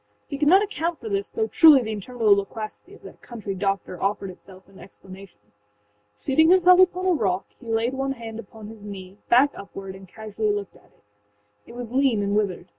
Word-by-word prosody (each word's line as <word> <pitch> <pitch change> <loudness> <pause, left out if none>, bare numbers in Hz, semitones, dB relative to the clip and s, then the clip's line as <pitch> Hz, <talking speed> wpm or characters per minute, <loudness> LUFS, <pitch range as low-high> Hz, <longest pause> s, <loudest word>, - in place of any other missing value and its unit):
He 280 - -6
could 295 - +2
not 380 +6 +6
account 340 -5 -3
for 440 - -7
this, 400 0 -2
though 445 - -1
truly 310 - +6
the 220 - -4
interminable 215 0 +1
loquacity 215 - -6
of - - -20
that - - -13
country 215 -5 -7
doctor 195 -2 -3
offered 195 -1 -2
itself 185 +1 -17
in 195 -1 -18
explanation. 190 - -14 0.8
Seating 315 - +2
himself 365 0 +6
upon 370 0 +3
a 375 - +3
rock, 195 - -1
he 245 - -14
laid 225 +2 0
one 270 0 -2
hand 230 -3 -8
upon 220 0 -11
his 220 -2 -12
knee, 195 -1 -10
back 265 +4 +5
upward, 195 -1 -9
and 190 0 -13
casually 215 +1 -3
looked 205 -1 -4
at - - -21
it. - - -31 0.6
It 235 - -12
was 240 -2 -7
lean 255 -5 +2
and 200 0 -1
withered. 205 -4 -1
220 Hz, 200 wpm, -24 LUFS, 195-280 Hz, 0.8 s, not